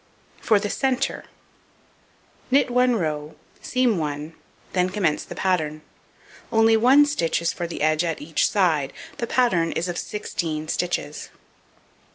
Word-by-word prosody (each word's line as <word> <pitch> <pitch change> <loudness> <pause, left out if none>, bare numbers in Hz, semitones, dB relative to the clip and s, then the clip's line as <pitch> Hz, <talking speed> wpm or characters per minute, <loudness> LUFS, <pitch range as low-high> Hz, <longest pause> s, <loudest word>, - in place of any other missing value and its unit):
For 220 - +4
the 205 0 -3
centre: 270 0 -1 1.2
Knit 265 -1 +3
1 250 0 +3
row, 155 -5 -3 0.3
seam 250 -7 +1
1, 150 +1 -4 0.4
then 180 0 +2
commence 185 -6 0
the - - -9
pattern. 155 -5 -1 0.7
Only 225 0 +5
1 260 +6 +6
stitch 290 - 0
is 170 0 -1
for 175 - -4
the 165 - -5
edge 155 +1 +2
at 165 -2 -2
each 155 +1 0
side, 160 -9 +1 0.3
the 235 - -2
pattern 185 -12 +2
is 170 - -2
of 175 - -3
16 160 -7 -4
stitches. 165 -4 -2
175 Hz, 140 wpm, -23 LUFS, 155-230 Hz, 1.2 s, 1